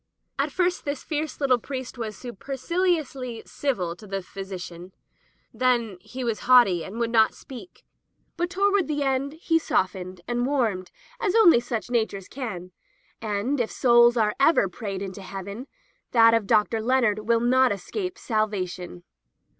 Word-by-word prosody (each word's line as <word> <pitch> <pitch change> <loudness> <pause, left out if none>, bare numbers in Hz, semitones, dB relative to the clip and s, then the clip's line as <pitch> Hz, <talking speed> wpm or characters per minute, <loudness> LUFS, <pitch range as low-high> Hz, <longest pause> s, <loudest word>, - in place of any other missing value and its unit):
At - - 0
first 360 -1 0
this 285 -1 -4
fierce 310 -1 -3
litde 260 -4 +2
priest 260 -1 -6
was 220 -4 -5
super 245 +2 -8
ciliously 280 -8 -1
civil 185 -12 -2
to 210 - -13
the 195 -1 -4
physician, 185 -2 -8 0.6
then 235 -5 +1
he 255 +7 -7
was 230 -3 -1
haughty 240 -9 +5
and 210 - -8
would 235 -1 -1
not 220 -2 +4
speak, 270 +5 -12 0.5
but 350 +1 -1
toward 395 0 +2
the 295 -2 -1
end 270 +1 0
he 325 0 +1
softened 185 - -2
and 240 +1 0
warmed 225 -10 0 0.3
as 425 -5 0
only 350 - +7
such 240 -2 -4
natures 220 -5 -1
can; 200 -9 -6 0.5
and 220 +6 -1
if 235 - 0
souls 240 -1 +5
are 215 -1 +2
ever 275 -7 +4
prayed 195 0 -5
into 195 0 -7
Heaven, 200 +6 -7 0.5
that 230 -1 +7
of 225 -3 +1
Dr. 220 +2 +2
Leonard 220 -3 +1
will 230 0 +4
not 255 +2 +3
escape 365 - -4
salvation. 185 - -3
235 Hz, 155 wpm, -25 LUFS, 200-275 Hz, 0.6 s, only